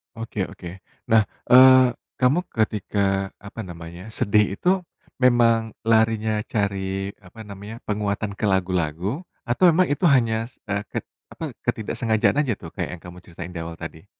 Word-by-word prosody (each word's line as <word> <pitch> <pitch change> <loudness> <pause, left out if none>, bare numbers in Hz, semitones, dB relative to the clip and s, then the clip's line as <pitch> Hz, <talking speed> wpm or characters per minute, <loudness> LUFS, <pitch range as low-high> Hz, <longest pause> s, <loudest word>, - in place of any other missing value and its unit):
Oke 110 -4 -3
oke. 90 - -10 0.4
Nah, 110 -2 +5 0.2
eee, 130 0 +8 0.3
kamu 145 +9 +3
ketika 100 -3 0
apa 100 +2 -10
namanya 85 0 -9
sedih 105 -1 +2
itu 175 - 0 0.5
memang 115 -3 +4 0.2
larinya 110 -1 +3
cari 95 -2 -2 0.2
apa 110 +5 -12
namanya 105 +2 -9
penguatan 105 0 -1
ke - - -1
lagu-lagu 95 - -1 0.2
atau 120 - 0
memang 180 -1 +3
itu 145 +5 0
hanya 115 -6 +3
se - - -33 0.3
ke - - -3 0.4
apa, - - -5 0.2
ketidak 110 - -2
sengajaan 110 +3 +2
aja 115 - 0
tuh 80 - -8
kayak - - -3
yang 85 - -9
kamu 90 0 -10
ceritain 85 0 -8
di - - -4
awal 85 0 -6
tadi? 80 +1 -9
105 Hz, 150 wpm, -23 LUFS, 95-115 Hz, 0.5 s, eee